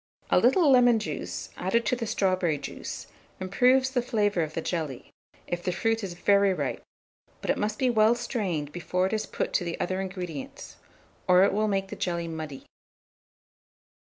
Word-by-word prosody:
A - - +6
little 290 +7 +4
lemon 245 -2 +6
juice 215 - -5
added 215 +6 0
to 250 - +2
the 235 -2 -4
strawberry 185 -6 +1
juice - - -7 0.3
improves 255 +8 +3
the 255 -2 +1
flavour 205 -6 +1
of 155 -1 -3
the - - 0
jelly, 155 -7 -4 0.3
if 175 0 -3
the 180 - -1
fruit 225 +3 0
is 185 -3 -5
very 200 +1 +3
ripe; - - -3 0.6
but - - 0
it - - -1
must 210 +1 -1
be 255 -2 +2
well 220 0 +4
strained 195 - -2
before 180 +2 -1
it 190 - -2
is 215 - -1
put - - -3
to - - +2
the 170 -1 -4
other 185 +2 -1
ingredients, 180 -6 -7 0.5
or 180 +1 +6
it 200 - +3
will 215 +1 +1
make 195 -1 -1
the - - -6
jelly 170 -2 -2
muddy. 155 -4 -6
195 Hz, 180 wpm, -27 LUFS, 175-225 Hz, 0.6 s, A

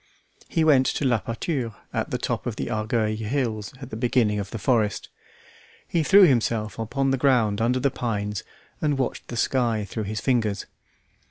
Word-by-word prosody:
He 165 - +1
went 140 -4 +5
to 145 - -1
La 120 -5 +2
Pâture 115 -1 -3 0.2
at - - -1
the - - -1
top - - -3
of - - -3
the 65 - -4
Argueil 110 0 0
hills 110 -2 -2
at 130 -2 -9
the - - -4
beginning 115 -3 +1
of 100 -1 -4
the 115 - -5
forest; 105 -2 0 0.8
he 170 - +1
threw 195 +6 +7
himself 115 - +2
upon 135 +5 0
the 135 - 0
ground 115 -6 +3
under 125 +3 +2
the 135 +1 +1
pines 105 -4 -3 0.4
and 145 -3 +1
watched 130 -2 -2
the 120 - -6
sky 115 -4 +1
through 105 +2 -4
his 105 +1 -3
fingers. 110 -6 0
115 Hz, 180 wpm, -25 LUFS, 110-130 Hz, 0.8 s, threw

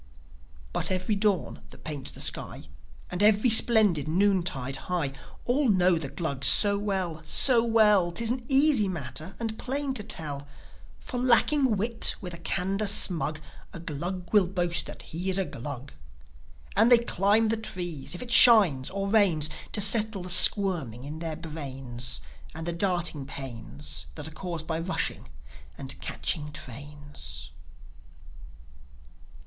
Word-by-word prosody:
But - - +1
every 185 +2 -1
dawn 200 -3 -1
that - - -16
paints 145 -4 -4
the - - -6
sky, - - 0 0.5
And 180 +2 -4
every 215 +3 +3
splendid 215 - +4
noontide 170 -7 0
high, 165 -7 -2 0.3
All 260 +1 +1
know 185 -3 +3
the 140 -4 -2
Glugs 140 -5 -2
so 200 +7 +5
well, 190 -6 -3
so 235 - +5
well. 210 -6 +3
'Tis 230 +6 0
an 250 0 -4
easy 275 -6 +4
matter, 155 0 -7
and 225 -2 -5
plain 275 +1 -3
to 255 - -2
tell. 150 -9 -6 0.5
For, 245 - -6
lacking 255 0 +3
wit, 230 +3 0
with 180 -3 -8
a 170 - -6
candour 195 +4 -1
smug, 165 -6 +2 0.3
A - - -8
Glug 175 +4 -6
will 205 -4 +4
boast 175 -2 -2
that - - -9
he 180 +4 -5
is 190 - +2
a 195 - 0
Glug. 135 0 -8 0.8
And 225 +5 +3
they 245 - +9
climb 220 -1 +2
the 225 - +1
trees, 175 -8 -5
if 175 - -6
it 245 - -7
shines 200 - +7
or 195 +1 -4
rains, 185 -8 +2 0.2
To 210 - +2
settle 210 -1 +3
the 180 - -3
squirming 175 - +2
in 150 +3 -8
their 165 -2 -5
brains, 135 -7 -5 0.3
And 160 0 -7
the 170 - -3
darting 175 -6 -1
pains 75 - -7
That - - -6
are - - -9
caused 170 -1 -6
by 160 0 -3
rushing 170 - -3 0.5
and 135 -1 -6
catching 150 -2 -3
trains. 135 - -8
180 Hz, 150 wpm, -26 LUFS, 150-210 Hz, 0.8 s, they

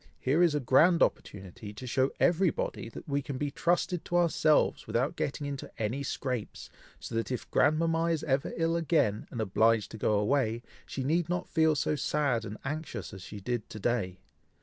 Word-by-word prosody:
here 145 +6 +2
is 170 -4 +4
a - - +2
grand 160 +7 +5
opportunity 100 +1 -3
to 110 +5 -9
show 130 +2 +1
everybody, 195 - +1
that - - -10
we 140 -1 0
can 135 -1 -5
be 145 +1 -2
trusted 175 +2 0
to 175 - 0
ourselves, 160 -3 +2
without 130 +4 0
getting 145 +1 -3
into 140 -1 -5
any 115 +5 -1
scrapes, 130 -5 -4 0.3
so - - -8
that 115 +2 -1
if 125 - -4
grandmama 165 +3 +3
is 165 -2 0
ever 135 -2 0
ill 165 0 +1
again, 155 -11 +1
and 120 - -6
obliged 110 +1 +2
to 110 - -8
go 110 - +2
away, 115 +1 +1 0.2
she 135 - -4
need 165 +4 +1
not 180 0 -1
feel 160 -1 +3
so 150 +1 0
sad 140 -5 0
and 105 +2 -6
anxious 155 -3 -5
as 95 - -9
she 100 +3 -8
did 120 +2 -3
to 110 - -8
day. 100 -5 -1
140 Hz, 190 wpm, -30 LUFS, 115-160 Hz, 0.3 s, grand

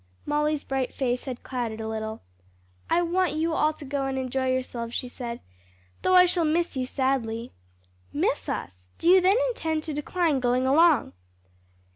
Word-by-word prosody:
Molly's 300 0 0
bright 265 -1 -2
face 250 -2 -1
had 255 -3 -6
clouded 235 -4 -3
a 220 - -4
little. 220 0 -4 0.7
"I 345 +1 +3
want 360 +1 +1
you 320 +1 0
all 310 -1 +3
to 300 - -11
go 275 0 -2
and 265 0 -2
enjoy 260 0 -1
yourselves," 240 -2 -3
she 250 - -2
said, 240 -1 -6 0.6
"though 370 - +3
I 360 0 +9
shall 355 -1 +1
miss 325 +1 +1
you 255 -1 -1
sadly." 245 -4 -1 0.6
"Miss - - -1
us! 90 0 -5
do - - -2
you 370 +1 +7
then 380 +4 +4
intend 320 -9 -2
to 310 - -4
decline 300 0 0
going 250 +1 +1
along?" 310 +1 +4
270 Hz, 170 wpm, -26 LUFS, 245-320 Hz, 0.7 s, I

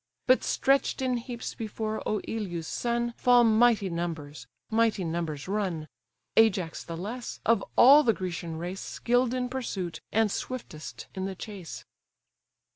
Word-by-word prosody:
But 255 0 +4
stretch'd 270 0 +1
in 255 -1 +1
heaps 235 0 -6
before 220 0 -4
Oïleus' 200 -5 -3
son, 235 +5 -1
Fall 245 -1 +5
mighty 225 -2 +4
numbers, 165 -4 -5 0.2
mighty 220 -3 +2
numbers 160 -3 -3
run; 185 -6 -2 0.5
Ajax 195 -7 +3
the 165 -1 -6
less, 225 +7 -5
of 225 -3 +3
all 280 +5 +9
the 245 -6 +4
Grecian 170 -4 -4
race 180 +3 -5
Skill'd 245 0 +1
in 250 -1 -1
pursuit, 220 -9 -4
and 220 -1 +2
swiftest 155 - -6
in 190 0 -3
the 190 0 -4
chase. 190 -3 -8
210 Hz, 135 wpm, -28 LUFS, 175-240 Hz, 0.5 s, all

